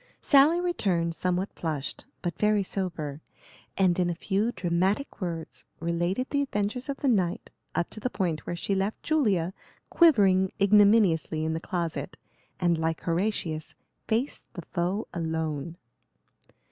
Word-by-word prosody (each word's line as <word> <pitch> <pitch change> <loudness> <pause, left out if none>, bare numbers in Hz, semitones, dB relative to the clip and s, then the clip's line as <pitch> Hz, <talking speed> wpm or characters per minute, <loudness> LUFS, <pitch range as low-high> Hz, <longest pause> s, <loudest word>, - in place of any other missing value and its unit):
Sally 290 +5 +5
returned 190 - 0
somewhat 180 +3 -1
flushed, 155 -4 -4 0.2
but 175 -3 -2
very 210 -1 +3
sober, 160 -7 -4 0.6
and 185 -2 +3
in 175 -1 +2
a 170 - -2
few 205 +6 0
dramatic 190 +8 -1
words 165 -3 -5 0.2
related 175 +8 -1
the 285 - +2
adventures 245 +1 -2
of 275 - -2
the 280 - -1
night, 185 -8 +1 0.2
up 170 - -1
to - - -7
the 250 - -1
point 175 -9 -2
where 175 - -2
she 185 +3 -2
left 195 +2 -1
Julia 200 - +1 0.4
quivering 195 - +5
ignominiously 200 -6 +4
in 160 - 0
the 160 - -2
closet, 165 -5 -3 0.4
and, 170 -2 +2
like 160 0 -1
Horatius, 170 -3 -2 0.3
faced 235 +6 -2
the 175 - -6
foe 180 +6 -2
alone. 160 -1 -3
185 Hz, 140 wpm, -27 LUFS, 170-210 Hz, 0.6 s, Sally